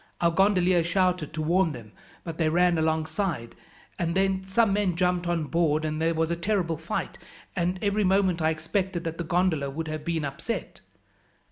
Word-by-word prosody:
Our 170 -1 +3
gondolier 185 -2 +3
shouted 180 -2 +1
to 155 - -2
warn 170 0 +2
them, 115 -4 -10 0.3
but 165 -1 -7
they 160 -1 +3
ran 175 0 +3
alongside, 160 - -1 0.5
and 170 -1 -1
then 190 0 +2
some 195 +2 +2
men 200 -4 +1
jumped 180 0 +1
on 170 -2 0
board, 155 -1 +1
and 155 0 -2
there 165 0 +1
was 160 +1 0
a - - +1
terrible 170 -2 -1
fight, - - -4 0.4
and 180 +1 0
every 205 +1 +1
moment 190 -3 +2
I 155 - +3
expected 170 +3 -2
that 165 0 -5
the - - -1
gondola 165 -4 +1
would 160 +4 -5
have 155 -1 -4
been 165 -2 -1
upset. 140 +12 -5
170 Hz, 180 wpm, -26 LUFS, 160-185 Hz, 0.5 s, Our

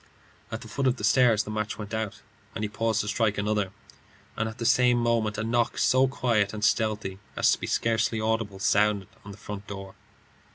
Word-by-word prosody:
At - - -4
the - - -10
foot 135 -1 -1
of 130 - +2
the 105 - -9
stairs 115 -1 +4
the 105 - -7
match 110 0 -3
went 105 0 -7
out, 110 -2 -3 0.3
and 110 - -3
he - - 0
paused 110 0 0
to 105 - -5
strike 110 -1 +1
another; 105 -2 0 0.6
and 115 0 -1
at 110 - -10
the 115 - -4
same 125 +1 +4
moment 115 -3 +1
a 110 - -2
knock, 120 +1 0
so 130 +1 +4
quiet 115 -6 0
and 105 0 -1
stealthy 105 -4 0 0.2
as - - +4
to - - +1
be - - -4
scarcely 115 0 +1
audible, 110 -2 -1
sounded 100 0 +2
on 100 - -11
the 100 - -9
front 105 -1 -8
door. 100 -1 -7
110 Hz, 210 wpm, -27 LUFS, 105-115 Hz, 0.6 s, stairs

